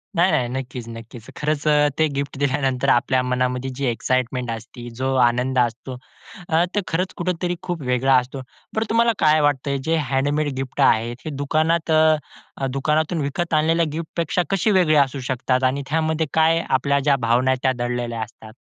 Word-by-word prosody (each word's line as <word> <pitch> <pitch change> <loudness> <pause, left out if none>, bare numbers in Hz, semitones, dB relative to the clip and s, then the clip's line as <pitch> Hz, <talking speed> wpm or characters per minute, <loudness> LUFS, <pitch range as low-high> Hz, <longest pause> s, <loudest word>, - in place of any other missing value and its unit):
नाही, 175 +3 +3
नाही. 120 - +1
नक्कीच, 125 -2 -5
नक्कीच. 115 +1 -12
खरंच 150 0 -1
अ 150 -1 +4
ते 155 - +4
गिफ्ट 140 -1 -3
दिल्यानंतर 135 -2 0
आपल्या 130 +1 +3
मनामध्ये 125 +1 -1
जी 140 - -1
एक्साईटमेंट 125 +1 -1
असते, 120 +2 -8
जो 135 0 0
आनंद 125 +2 +1
असतो 120 +2 -2 0.5
अ, 165 +2 +3
तर 205 - +2
खरंच 180 +3 -2
कुठेतरी 175 0 -2
खूप 175 -4 -4
वेगळा 125 +2 +2
असतो. 130 +1 -8 0.3
बरं 220 +1 0
तुम्हाला 230 +1 +3
काय 155 0 +4
वाटतंय? 140 -1 0
जे 165 - +2
हँडमेड 145 +3 0
गिफ्ट 135 +1 -3
आहेत, 120 -2 +3
हे - - -3
दुकानात 160 +3 +1
अ, 155 -3 0
दुकानातून 155 +3 0
विकत 155 +5 -3
आणलेल्या 160 +2 +3
गिफ्टपेक्षा 165 +2 -2
कशी 195 +2 +1
वेगळी 175 -5 +3
असू 135 +1 -7
शकतात? 130 0 0
आणि 130 +2 +1
त्यामध्ये 160 0 0
काय 160 +1 +3
आपल्या 140 +2 +2
ज्या 140 0 +3
भावना 130 +3 +3
त्या 130 - +3
दडलेल्या 120 -1 -2
असतात? 110 -1 -9
140 Hz, 165 wpm, -22 LUFS, 125-160 Hz, 0.5 s, अ